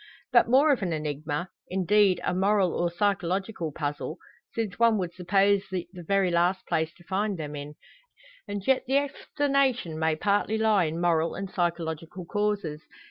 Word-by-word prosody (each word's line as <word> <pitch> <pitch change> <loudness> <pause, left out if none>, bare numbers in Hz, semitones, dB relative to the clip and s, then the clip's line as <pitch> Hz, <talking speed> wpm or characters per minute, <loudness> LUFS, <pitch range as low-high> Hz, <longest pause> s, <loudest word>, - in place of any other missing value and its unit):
But 240 -2 +5
more 280 +5 +5
of 270 - +1
an 180 -4 -1
enigma 150 +2 -3 0.2
indeed, 190 0 +3
a - - 0
moral, 190 -1 +2
or 175 - 0
psychological 190 -1 -1
puzzle; 145 +2 -4 0.3
since 220 -3 -3
one 230 -2 +5
would 180 -3 -3
suppose 195 +2 +2
it 180 -2 -3
the 180 - -9
very 190 +1 +1
last 175 +2 +1
place 160 -2 0
to 175 - -19
find 200 +2 -1
them 150 -2 -5
in. 145 +1 -7 0.7
And 205 -1 -5
yet 265 -1 +2
the 270 +2 +3
explanation 275 - 0
may 160 -1 +2
partly 205 +5 +1
lie 215 -4 +3
in 160 +2 -3
moral 165 -1 +1
and 195 -1 -5
psychological 170 0 -3
causes. 205 -6 -1
185 Hz, 165 wpm, -27 LUFS, 165-210 Hz, 0.7 s, But